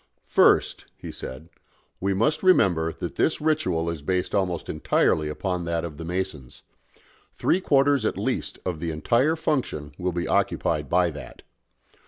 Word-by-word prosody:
"First," - - +3
he - - -8
said, 65 +5 -8 0.5
"we 95 +1 0
must 115 +10 +1
remember 90 - +3
that 85 - -7
this 160 - +1
ritual 145 - 0
is 85 -3 -3
based 90 +4 -1
almost 90 -4 -1
entirely 75 0 +1
upon 90 +3 -3
that 85 0 -1
of 75 -4 -8
the 80 - -7
Masons. 85 -7 -5 0.7
Three 185 - +1
quarters 140 -5 +3
at - - -1
least - - -2
of 90 -4 -3
the 85 +1 -3
entire 120 - +2
function 120 - -2
will 90 0 -1
be 85 0 -3
occupied 75 -4 0
by 90 0 +3
that. 70 -5 -10
90 Hz, 155 wpm, -25 LUFS, 80-110 Hz, 0.7 s, First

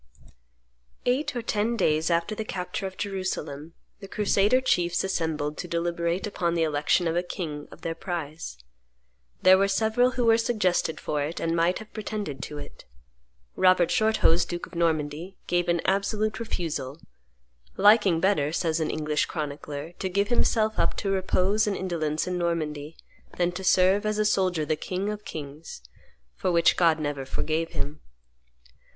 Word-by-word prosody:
Eight 255 +3 0
or 240 - -3
ten 225 +1 0
days 155 -4 +2
after 170 +4 +1
the 220 - -3
capture 185 -1 -4
of 190 - -10
Jerusalem, 165 -6 -4 0.2
the 195 - -9
crusader 210 +4 +3
chiefs 175 -9 +1
assembled 155 -5 -2
to 180 - -4
deliberate 170 +2 -1
upon 175 -5 -1
the 165 - +2
election 155 +3 +1
of 165 - 0
a 175 - +2
king 160 -5 -5
of - - -14
their 165 - -2
prize. 160 - -5 0.9
There 185 +1 +7
were 195 - +3
several 220 +5 +2
who 245 - +2
were 225 0 +5
suggested 185 -8 +1
for 150 -1 -2
it 150 +4 -3
and 165 0 0
might 170 +2 +2
have 220 - -11
pretended 210 -9 -4
to 150 - -6
it. 145 0 -10 0.7
Robert 185 -2 +4
Shorthose, 215 -6 +3
duke 175 0 -5
of - - -19
Normandy, 165 +1 -1
gave 175 0 0
an 170 -1 +2
absolute 210 +2 0
refusal, 155 - -4 0.8
"liking 205 -4 +5
better," 165 -6 +2
says 165 -1 0
an 155 - 0
English 150 -1 0
chronicler, 150 0 -5
"to 190 - -2
give 200 +3 0
himself 220 -2 +2
up - - +1
to 195 - -1
repose 195 +2 +1
and 200 - 0
indolence 160 -4 -1
in 180 -1 -2
Normandy 155 -3 -2 0.4
than 175 0 +2
to 185 +2 -6
serve, 190 +3 +4
as 215 0 0
a 215 - +2
soldier, 185 -6 +1
the 155 - 0
King 190 +6 -3
of 210 0 -6
kings: 150 - -8 0.5
for 185 - -1
which 170 -1 +4
God 165 -3 +3
never 145 -2 -2
forgave 160 +4 -2
him." 150 +2 -4
175 Hz, 165 wpm, -26 LUFS, 155-200 Hz, 0.9 s, There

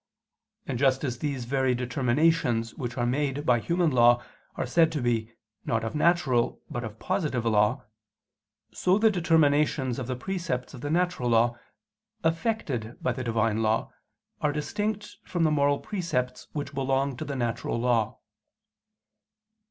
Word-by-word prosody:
And 125 -4 -3
just 135 0 +3
as 125 -4 -2
these 135 -4 -3
very 130 0 +1
determinations 125 -1 +1
which 120 -1 -5
are 120 - +1
made 140 +3 -1
by 125 -3 +4
human 170 +5 +1
law 120 -1 +5 0.3
are - - -2
said 160 +6 +3
to 150 - -1
be, 115 -3 0 0.3
not 115 -1 -1
of 115 - -3
natural, 150 -6 +2
but 120 - -3
of 110 -1 -7
positive 150 - -1
law; 105 -2 +2 0.9
so 185 +1 +2
the 220 0 +4
determinations 150 - +2
of 125 - -4
the 130 - -2
precepts 170 -4 -3
of 125 - -9
the 145 - -3
natural 175 -6 +1
law, 120 +1 +3 0.7
effected 160 - -1
by 125 - 0
the 130 +1 -4
Divine 115 -2 +1
law, 110 0 0 0.5
are 150 - +2
distinct 210 +8 -3
from 175 -2 -1
the 155 - +3
moral 145 -1 +3
precepts 165 -12 -3
which 145 0 -5
belong 135 0 0
to - - -4
the 140 - -4
natural 120 -1 -2
law. 120 -3 +1
130 Hz, 150 wpm, -27 LUFS, 120-155 Hz, 0.9 s, law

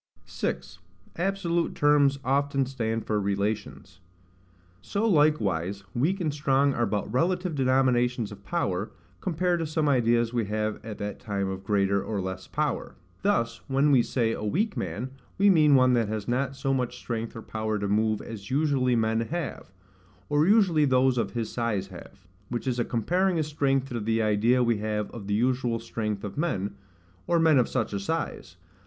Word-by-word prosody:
6. 90 0 -4 0.4
Absolute 175 -2 -1
Terms 145 -1 +4
often 140 +1 +1
stand 115 -4 -3
for 105 -1 0
Relations. 100 -2 -3 0.8
So 205 - -1
likewise 100 - +2
weak 165 +11 +1
and 155 -5 -1
strong 140 -1 +2
are 120 -2 0
but 105 0 -2
relative 180 +5 +1
denominations 125 -4 +2
of 100 -1 -11
power, 100 - -1 0.3
compared 180 0 0
to 165 - -2
some 155 0 0
ideas 120 -3 +2
we 120 -3 0
have 110 +1 -2
at 110 -2 -7
that 105 0 -5
time 100 -2 -2
of 95 0 -5
greater 100 -1 +1
or 105 -3 -3
less 95 0 -5
power. - - -2 0.3
Thus, 155 - 0
when 140 +2 +3
we 130 -3 +6
say 115 -1 0
a 115 - -4
weak 200 - 0
man, 105 +9 -4 0.3
we 200 +1 +5
mean 155 -5 +5
one 130 -1 +5
that 115 -3 +2
has 110 -1 -4
not 130 +2 -1
so 135 0 -1
much 125 -2 -1
strength 115 -2 -4
or 115 - -7
power 110 -1 -2
to 100 0 -2
move 110 +1 +1
as 100 -3 -8
usually 135 -3 +2
men 110 0 +1
have, 150 - -4 0.6
or 150 +2 +3
usually 190 -8 +4
those 130 -1 +3
of - - -2
his 115 -2 -3
size 105 -5 -1
have; 95 +1 -13 0.2
which 120 +1 -3
is 125 -2 -1
a - - +3
comparing 175 - 0
his 155 - +1
strength 135 -3 0
to 120 - -3
the 110 +1 0
idea 110 +4 +3
we 120 -2 +2
have 105 -1 -2
of 105 -4 -8
the 105 - 0
usual 125 0 +1
strength 110 -3 -4
of 105 +7 -5
men, 100 - -1 0.5
or 170 - +3
men 160 -4 +5
of 125 - +1
such 120 -5 -1
a 100 - -1
size. 100 - -4
120 Hz, 180 wpm, -27 LUFS, 105-145 Hz, 0.8 s, we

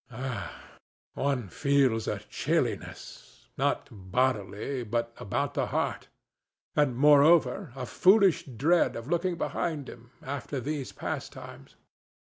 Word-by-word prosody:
Ah! 125 -3 -5 0.5
One 135 -5 -1
feels 130 - +2
a - - -1
chilliness—not - - -3
bodily, 110 +4 -1
but 115 +1 -2
about 120 +6 -2
the - - 0
heart—and, 145 -5 -3
moreover, 150 +4 +5
a 130 -2 -4
foolish 190 - +4
dread 145 +8 +2
of 115 - -6
looking 175 +2 0
behind 155 -5 -2
him, 120 0 -12
after 140 0 -4
these 140 +1 -4
pastimes. - - -7
135 Hz, 100 wpm, -28 LUFS, 120-150 Hz, 0.5 s, moreover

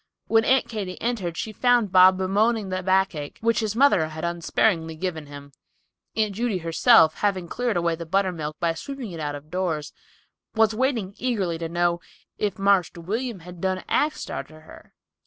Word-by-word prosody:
When 225 0 +3
Aunt 265 0 +3
Katy 200 -5 -5
entered 195 -9 -2
she 220 - -3
found 240 -3 +2
Bob 185 0 +7
bemoaning 205 +3 +1
the 185 0 -2
backache, 185 -6 0
which 230 +1 +2
his 215 -2 -2
mother 235 - +4
had 155 +1 -6
unsparingly 170 -1 0
given 160 -3 -4
him! 140 0 -11 0.6
Aunt 215 -2 0
Judy 225 -1 -1
herself, 165 0 +4
having 190 -4 0
cleared 240 +1 -1
away 170 -1 +1
the 165 0 -6
buttermilk, 170 -5 -1
by 170 -1 +1
sweeping 255 +4 -7
it 165 - -7
out 145 -1 -3
of 145 +2 -11
doors, 175 -5 -2 0.6
was 220 0 +3
waiting 230 -5 -1
eagerly 200 -10 -1
to 165 -1 -4
know 175 0 0 0.4
"if 205 -3 -1
Marster 195 -3 +2
William 225 +6 -3 0.2
done 185 +1 -1
axed 300 +1 0
arter 155 0 -7
her." 155 - -16
185 Hz, 170 wpm, -24 LUFS, 165-220 Hz, 0.6 s, Bob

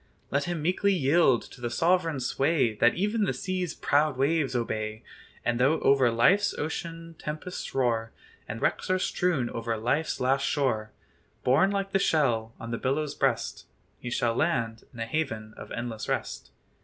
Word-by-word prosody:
Let 140 +1 +1
him 175 -3 -3
meekly 185 +4 +2
yield 145 -5 +3
to - - -14
the 120 - -2
sovereign 165 +2 +1
sway 135 -1 +1
That 120 +3 +3
even 210 +4 +1
the - - 0
sea's 185 -3 -3
"proud 145 -1 +2
waves" 140 -1 +1
obey; 110 -2 -2 0.4
And 120 0 +1
though 140 +6 +3
over 135 -3 +4
life's 190 - +3
ocean 165 +2 -5
tempests 155 +3 -6
roar, 115 -4 +1 0.4
And 110 +2 -5
wrecks - - 0
are 185 - +3
strewn 175 -8 0
over 115 0 -2
"life's 135 +8 0
last 135 +2 +2
shore," 110 -7 0 0.5
Borne 140 +10 +4
like 195 -1 -2
the 195 - +2
shell 120 -10 +1
on 115 0 -6
the 115 - -2
billow's 140 +3 -1
breast, - - -1 0.3
He 120 - -5
shall 120 -1 +1
land 115 -6 -1
in 120 - -12
a 115 - -1
haven 115 -6 -3
of - - -10
endless 115 -2 -4
rest. - - -3
135 Hz, 165 wpm, -28 LUFS, 115-165 Hz, 0.5 s, over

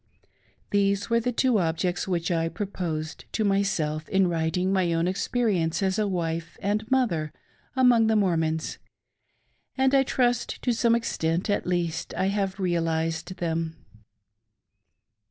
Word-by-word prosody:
These 200 +1 +1
were 230 - +4
the 245 +2 -1
two 245 -2 +2
objects 175 +2 -1
which 175 -2 -1
I 165 -1 +1
proposed 165 -6 -4
to 220 - 0
myself 190 -7 0
in 190 -1 +3
writing 175 +3 0
my 185 -3 +2
own 165 +1 +1
experience 190 -3 0
as 190 +1 +1
a 210 - +1
wife 165 -3 -3
and 210 +3 -1
mother 190 -13 +1 0.4
among 245 -3 +5
the 220 - +3
Mormons, 160 -5 0 1.0
and 265 0 +3
I 275 - +6
trust 245 -2 0
to 245 - +2
some 230 0 +3
extent 175 -4 -1
at 200 - -1
least 175 -2 -2
I 190 - +1
have 195 -1 -1
realised 165 -1 -1
them. 165 -2 -2
185 Hz, 135 wpm, -26 LUFS, 165-215 Hz, 1.0 s, I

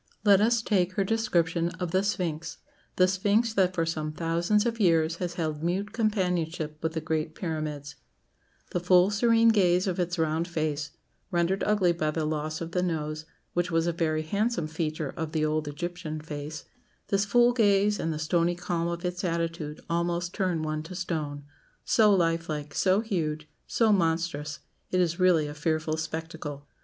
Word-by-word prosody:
Let 200 -2 +6
us 230 +1 +3
take 185 -5 +1
her 195 - +1
description 175 -6 +1
of 180 -2 -2
the 185 +1 +3
Sphinx 170 -6 -2 0.4
the 185 - +5
Sphinx 205 +4 +2
that 185 -3 +2
for 165 - +1
some 155 -2 -2
thousands 170 +7 +1
of 230 -1 -1
years 165 -4 +3
has 175 -1 -4
held 155 -3 -2
mute 190 +5 -1
companionship 180 -8 -1
with 160 0 -1
the 160 - -2
Great 155 0 -2
Pyramids: 155 -4 -4 0.8
"The 180 - 0
full 180 +2 +4
serene 230 +2 +4
gaze 185 -4 +3
of 185 -2 -2
its 175 0 -1
round 160 +1 0
face, 155 -4 -2 0.4
rendered 175 +1 +1
ugly 205 -4 +3
by 160 -3 -1
the 155 0 -1
loss 155 +1 -2
of 165 0 -5
the 180 - 0
nose, 155 -3 -2 0.3
which 175 0 0
was 165 -1 +1
a 170 - +1
very 155 -2 0
handsome 200 +2 0
feature 155 -2 -3
of 160 -2 -4
the 155 -1 +1
old 155 0 -1
Egyptian 170 +1 -5
face 150 0 -6 0.5
this 200 -1 +2
full 240 +4 +4
gaze, 205 -3 +3
and 165 - -1
the 155 - -3
stony 170 +3 +1
calm 175 -1 -2
of 170 +1 -4
its 180 +2 -3
attitude 165 -3 -2
almost 170 +1 -1
turn 180 -5 0
one 155 0 -2
to 170 +4 -9
stone. 155 -6 -3 0.4
So 215 -2 +5
life 165 -3 +1
like, 150 -1 -4
so 190 +2 +3
huge, 155 -8 -2 0.2
so 225 -2 +3
monstrous; 165 -4 0 0.3
it 185 - +1
is 170 -1 +1
really 180 -4 +4
a 145 - -6
fearful 155 +1 -1
spectacle. 160 -2 -5
170 Hz, 175 wpm, -27 LUFS, 155-185 Hz, 0.8 s, Let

